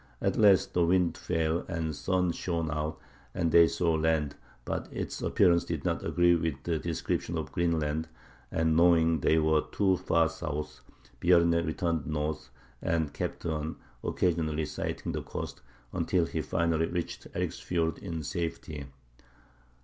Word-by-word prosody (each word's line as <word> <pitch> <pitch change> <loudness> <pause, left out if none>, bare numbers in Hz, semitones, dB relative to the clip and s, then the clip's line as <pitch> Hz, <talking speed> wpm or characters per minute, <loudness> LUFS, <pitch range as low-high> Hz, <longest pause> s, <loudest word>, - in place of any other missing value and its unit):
At - - 0
last 100 -3 +5
the 90 - +3
wind 85 -1 +3
fell, 85 -2 0
the 80 -2 -3
sun 90 +5 0
shone 85 -2 -2
out, 75 0 -2 0.4
and 85 -1 +1
they 85 0 +7
saw 85 -1 +1
land; 80 -2 +1 0.3
but - - -3
its - - -4
appearance 85 -1 +4
did - - -4
not - - 0
agree 85 0 +4
with 80 -3 -1
the 85 -2 -1
description 85 0 -2
of 75 -4 -4
Greenland, 80 -2 0 0.4
and 80 -1 +2
knowing 85 -1 +5
they 80 - +3
were 80 -1 +3
too 95 -2 +2
far 85 -1 +2
south, 80 -2 -5 0.4
Bjarne 85 -1 +4
turned 85 -6 -1
north, 75 -1 -2 0.3
and 80 -3 0
kept - - -4
on, 80 -1 -2 0.3
occasionally 80 -3 0
sighting - - -4
the - - -3
coast, - - -6 0.3
until 90 0 +1
finally 80 0 0
he - - -8
reached 85 -1 -4
Eriksfiord 80 -3 -1
in 85 -5 -5
safety. 75 -2 -4
80 Hz, 145 wpm, -29 LUFS, 80-85 Hz, 0.4 s, they